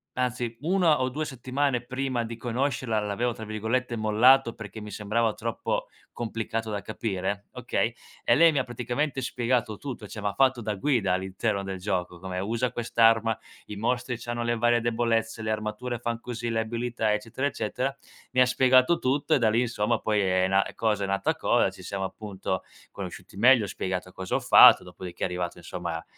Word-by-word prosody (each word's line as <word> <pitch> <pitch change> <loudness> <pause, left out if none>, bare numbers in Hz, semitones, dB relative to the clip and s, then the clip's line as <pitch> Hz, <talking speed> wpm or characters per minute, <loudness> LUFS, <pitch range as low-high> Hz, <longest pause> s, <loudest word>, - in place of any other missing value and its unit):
anzi 125 -2 -1
1 170 -4 +3
o 130 - +1
2 150 +4 -3
settimane 130 -1 -1
prima 130 -1 -2
di 115 0 -6
conoscerla 120 -2 -1
l'avevo, 105 +4 -1
tra 110 - -8
virgolette, 110 +4 -1
"mollato" 115 +3 +4
perché 110 0 -9
mi 105 - -8
sembrava 110 +2 0
troppo - - -3 0.2
complicato 115 -1 -3
da 105 -1 -3
capire 100 -2 -3
okay, - - -1 0.3
e - - +4
lei 165 +1 +7
mi 145 - +1
ha - - +1
praticamente 125 +4 -2
spiegato 120 -3 0
tutto, 125 -6 -6
cioè 110 - -8
m'ha 100 -1 -1
fatto 130 0 +3
da 105 -1 -2
guida 110 -3 +1
all'interno 95 +2 -1
del 95 -1 -5
gioco 90 -2 -2
come: 95 0 -5
"Usa 115 +5 -1
quest'arma, 115 -1 +3 0.3
i 105 - -6
mostri 120 +3 -1
c'hanno 120 0 -3
le 120 0 0
varie 120 0 +3
debolezze, 115 -1 0
le 110 - -3
armature 110 +3 -3
fan 115 -1 -3
così, 120 -1 -4
le 115 - 0
abilità." 115 -1 -1
Eccetera, 125 +5 -2
eccetera. 135 0 -2 0.4
Mi 130 - +4
ha - - +7
spiegato 130 +4 +4
tutto 140 +4 +1
e - - +2
da 115 -3 +3
lì 115 +3 +2
insomma 115 -1 0
poi 105 -1 0
è 95 -1 +2
na 95 +1 +3
cosa 105 -3 0
è - - -4
nata 100 0 0
cosa, - - +2
ci - - -13
siamo 100 -1 -4
appunto 95 -1 -4 0.3
conosciuti - - -8
meglio, 120 0 +6
spiegato 90 -1 -4
cosa 95 0 -4
ho - - +2
fatto, - - +8
dopodiché 90 0 -8
è - - +4
arrivato 90 -1 -3
insomma 85 -1 -5
115 Hz, 185 wpm, -27 LUFS, 105-125 Hz, 0.4 s, fatto